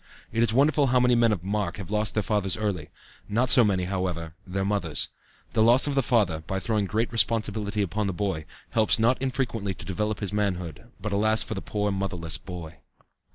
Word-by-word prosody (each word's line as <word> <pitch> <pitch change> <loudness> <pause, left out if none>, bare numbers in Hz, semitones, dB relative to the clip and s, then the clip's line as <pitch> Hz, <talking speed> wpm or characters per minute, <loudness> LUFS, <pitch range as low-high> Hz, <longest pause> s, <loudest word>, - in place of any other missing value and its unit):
It 115 - 0
is 115 -2 +3
wonderful 140 +3 +3
how 125 0 +3
many 125 0 +4
men 120 -1 +4
of 95 -5 -2
mark 100 -3 -2
have 100 -1 -7
lost 105 0 +1
their 105 - +1
fathers 100 -3 0
early; 100 -8 -2 0.4
not 120 +5 +3
so 125 - +7
many, 95 -4 +1
however, 90 -3 -3
their 95 +1 -2
mothers. 100 -7 -1 0.4
The 110 - +2
loss 120 +4 +6
of 145 - +1
the 135 - +3
father, 105 - +1
by 95 +4 -3
throwing 105 +1 0
great 110 +5 -1
responsibility 110 -2 0
upon 100 +3 -2
the - - 0
boy, 90 -4 -2 0.3
helps 110 +2 +3
not 120 +3 +2
infrequently 125 -7 -2
to - - -10
develop 105 +3 -2
his 100 -1 -4
manhood; 90 -7 -2
but 105 +1 -4
alas 110 +2 +3
for - - -5
the 95 - -5
poor 105 -1 -1
motherless 95 -4 -3
boy. 85 -4 -9
105 Hz, 200 wpm, -26 LUFS, 95-115 Hz, 0.4 s, so